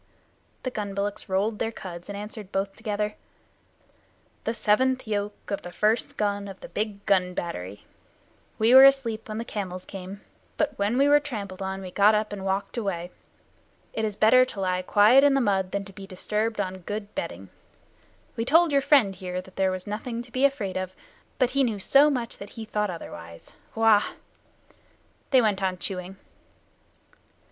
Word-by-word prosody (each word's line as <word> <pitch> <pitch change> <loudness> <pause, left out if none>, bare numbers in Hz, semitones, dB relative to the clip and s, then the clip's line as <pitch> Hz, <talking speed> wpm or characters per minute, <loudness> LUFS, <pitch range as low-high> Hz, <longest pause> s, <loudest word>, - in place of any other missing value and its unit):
The 255 - -2
gun 205 -4 -4
bullocks 200 0 -3
rolled 205 +3 0
their 225 - -1
cuds, 175 -4 -9
and 200 - -5
answered 210 -1 -8
both 195 0 -2
together: 210 -1 -2 1.3
"The 225 - 0
seventh 255 +5 +2
yoke 205 -1 -4
of 200 - -2
the 175 - -8
first 215 +5 0
gun 205 -1 -1
of 195 -1 -9
the - - -9
Big 205 -1 -4
Gun 180 -2 +2
Battery. 100 - -5 0.7
We 225 +3 +4
were 265 +1 +11
asleep 235 -6 +2
when 215 - -4
the 230 - -4
camels 185 -5 -5
came, 195 +1 -8 0.4
but 295 -2 0
when 205 +5 +1
we 280 +1 +4
were 290 0 +6
trampled 205 -10 -6
on 190 0 -3
we 185 - -7
got 205 +3 +5
up 210 0 -1
and 195 -2 -6
walked 195 +4 -2
away. 180 -5 -3 0.8
It 220 - -2
is 210 -2 -1
better 240 +5 +6
to 255 -5 -6
lie 185 -1 0
quiet 210 +8 +6
in 285 -1 +5
the - - +3
mud 195 -6 +1
than 200 0 -2
to 195 - -13
be 195 0 -10
disturbed 210 +4 -2
on 190 -1 -2
good 205 +3 -6
bedding. 90 +2 -5 0.9
We 230 - -1
told 325 +6 +4
your 280 -1 +3
friend 270 -8 +4
here 180 -1 -5
that 185 0 -12
there 190 -1 +2
was 185 0 -4
nothing 230 +3 -4
to 245 - -15
be 260 +3 +2
afraid 215 -10 0
of, 185 0 -4 0.4
but 255 -1 +2
he 275 +1 +2
knew 225 -5 0
so 275 +9 +5
much 245 -5 -3
that 200 - -8
he 225 - -5
thought 210 -1 -1
otherwise. 85 - -9 0.2
Wah!" 225 -2 +5 1.3
They 260 -3 +5
went 205 -3 +1
on 185 -1 0
chewing. 185 +1 -4
205 Hz, 185 wpm, -26 LUFS, 190-230 Hz, 1.3 s, were